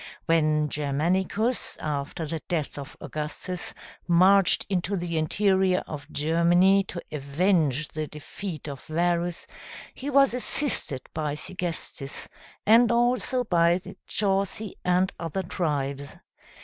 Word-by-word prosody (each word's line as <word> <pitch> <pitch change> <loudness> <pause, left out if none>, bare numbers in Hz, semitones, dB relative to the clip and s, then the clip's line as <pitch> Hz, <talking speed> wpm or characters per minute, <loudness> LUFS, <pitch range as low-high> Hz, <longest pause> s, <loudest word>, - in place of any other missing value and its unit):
When 155 -2 +2
Germanicus, 180 - 0
after 150 +2 -3
the 155 +1 -4
death 155 -4 -2
of 140 +2 -9
Augustus, 160 +4 -5 0.3
marched 185 +2 +5
into 195 +1 -1
the 170 -1 -3
interior 190 +3 +2
of 145 -2 -8
Germany 175 +5 +3
to 175 -2 -7
avenge 150 0 +1
the 155 0 -4
defeat 155 +2 -7
of 140 -2 -7
Varus, 170 +1 -1 0.5
he 275 - -6
was 275 -2 +5
assisted 250 - +2
by 150 -2 -2
Segestes, 170 -5 -4 0.4
and 230 +2 +6
also 245 +1 +1
by 170 -5 +3
the 185 - -10
Chauci 200 +1 0
and 180 +1 +2
other 170 +3 -3
tribes. 140 -5 -3
175 Hz, 115 wpm, -26 LUFS, 150-195 Hz, 0.5 s, and